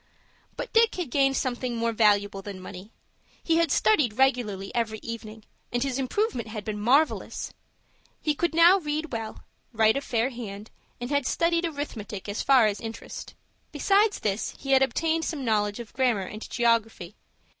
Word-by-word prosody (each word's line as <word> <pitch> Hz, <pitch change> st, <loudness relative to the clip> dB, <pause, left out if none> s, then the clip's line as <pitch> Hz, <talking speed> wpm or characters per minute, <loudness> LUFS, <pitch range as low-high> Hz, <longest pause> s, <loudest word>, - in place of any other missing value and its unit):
But -, -, -6 dB
Dick 455 Hz, 0 st, +4 dB
had 345 Hz, -9 st, -4 dB
gained 270 Hz, -1 st, +3 dB
something 250 Hz, -1 st, -2 dB
more 230 Hz, 0 st, 0 dB
valuable 205 Hz, -3 st, +2 dB
than 195 Hz, -1 st, -8 dB
money. 185 Hz, +3 st, -10 dB, 0.5 s
He 330 Hz, -1 st, +2 dB
had 335 Hz, -3 st, +2 dB
studied 215 Hz, +2 st, +3 dB
regularly 240 Hz, -8 st, +1 dB
every 225 Hz, -2 st, -1 dB
evening, 220 Hz, -1 st, -7 dB, 0.3 s
and 245 Hz, +1 st, 0 dB
his 270 Hz, -1 st, -2 dB
improvement 265 Hz, -, -1 dB
had 215 Hz, -2 st, -6 dB
been 210 Hz, -1 st, -3 dB
marvellous. 275 Hz, +8 st, +1 dB, 0.7 s
He 300 Hz, -, 0 dB
could 335 Hz, +2 st, -1 dB
now 345 Hz, +4 st, +7 dB
read 305 Hz, -1 st, -3 dB
well, 225 Hz, -2 st, -5 dB, 0.3 s
write 220 Hz, -1 st, +3 dB
a 275 Hz, -, -1 dB
fair 245 Hz, -1 st, 0 dB
hand, 215 Hz, -3 st, -8 dB, 0.3 s
and 245 Hz, +3 st, -5 dB
had 285 Hz, -3 st, +1 dB
studied 335 Hz, 0 st, +1 dB
arithmetic 225 Hz, -, -6 dB
as 205 Hz, +1 st, -3 dB
far 265 Hz, -4 st, +5 dB
as 210 Hz, -1 st, -1 dB
Interest. 225 Hz, 0 st, -8 dB, 0.4 s
Besides 410 Hz, +1 st, +2 dB
this 205 Hz, 0 st, -2 dB
he 275 Hz, -, -5 dB
had 265 Hz, 0 st, +6 dB
obtained 320 Hz, +4 st, +1 dB
some 305 Hz, -5 st, -3 dB
knowledge 210 Hz, -1 st, +1 dB
of 235 Hz, -3 st, -9 dB
grammar 240 Hz, -7 st, +1 dB
and 215 Hz, +4 st, -8 dB
geography. 225 Hz, -6 st, 0 dB
240 Hz, 165 wpm, -26 LUFS, 215-290 Hz, 0.7 s, now